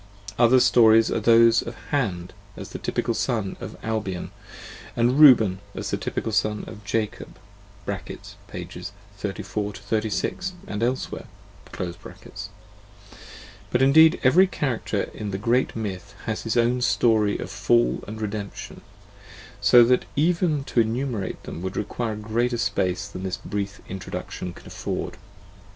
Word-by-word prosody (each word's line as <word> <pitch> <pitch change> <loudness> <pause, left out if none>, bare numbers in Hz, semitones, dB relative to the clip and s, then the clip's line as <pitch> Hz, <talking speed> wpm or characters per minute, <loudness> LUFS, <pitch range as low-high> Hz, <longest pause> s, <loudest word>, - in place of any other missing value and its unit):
Other 125 +2 +6
stories 115 -2 +5
are - - +1
those 115 +1 +5
of 115 - -7 0.2
Hand 95 -11 -1 0.2
as - - -8
the - - -7
typical 115 - -1
Son 110 -5 -1
of - - -7
Albion, 105 -5 -3 0.7
aud 120 +1 +3
Reuben 125 -10 +6 0.2
as - - -4
the - - +1
typical 110 - -3
Son 105 0 0
of 105 - -10
Jacob 105 +1 -3 0.5
(pp. 100 -1 -7 0.3
34 100 +1 -3
36 110 - -2
and 105 +1 -5
elsewhere): 125 +2 -2 0.5
but 90 -1 -4 1.9
indeed 160 +5 +6
every 175 +9 +6
character 120 - -2
in 105 -2 -5
the 95 - -3
great 120 +5 +1
myth 100 -3 -5
has 110 0 -3
its 115 - 0
own 120 +1 +2
story 110 -4 +3
of - - -6
fall 120 0 +2
and 110 +1 -7
redemption, 105 -1 -5 0.8
so 110 +4 +7
that 125 +2 +3
even 160 -1 +2
to 125 - +2
enumerate 115 -3 -2
them 85 - -7
would 95 +1 -4
require 110 +2 -2
a - - -5
greater 115 +3 -1
space 95 -4 -1
than 95 -2 -8
this 95 -1 -3
brief 100 0 -5
Introduction 90 -1 -6
can - - -15
afford. - - -4
110 Hz, 135 wpm, -24 LUFS, 100-120 Hz, 1.9 s, so